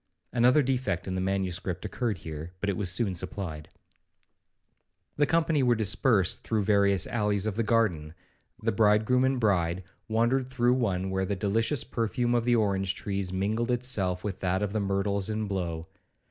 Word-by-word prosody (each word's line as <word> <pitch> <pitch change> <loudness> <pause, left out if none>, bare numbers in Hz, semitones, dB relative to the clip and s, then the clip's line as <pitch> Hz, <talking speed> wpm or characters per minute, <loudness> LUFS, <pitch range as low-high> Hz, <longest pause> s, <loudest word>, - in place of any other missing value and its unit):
(Another 125 +5 +4
defect 125 -9 -1
in 95 - -2
the 95 - -1
manuscript 95 -1 -2
occurred 110 -1 -2
here, 80 +1 -8
but 100 +1 0
it - - -3
was 100 -2 -1
soon 100 +1 0
supplied). 85 -3 -5 1.5
'The 145 0 +3
company 165 -2 +2
were 125 -2 +3
dispersed 105 -2 +2
through 110 -2 0
various 100 -2 +3
alleys 105 -3 -1
of 110 -3 -2
the 115 - 0
garden; 100 -9 0 0.5
the - - +2
bridegroom 110 +4 +3
and 130 -1 +1
bride 95 -5 +1 0.2
wandered 120 +4 +1
through 125 -2 +2
one 95 -7 -1
where 95 0 0
the 100 - -2
delicious 115 +7 0
perfume 120 +2 -1
of 120 -1 +1
the 120 0 +3
orange 95 -3 +1
trees 100 -2 -3
mingled 105 +6 -1
itself 110 -8 0
with 100 -3 -4
that 95 +1 0
of 105 -1 -3
the 110 - 0
myrtles 100 0 -1
in 110 0 -2
blow. 85 -4 -3
105 Hz, 170 wpm, -28 LUFS, 95-120 Hz, 1.5 s, Another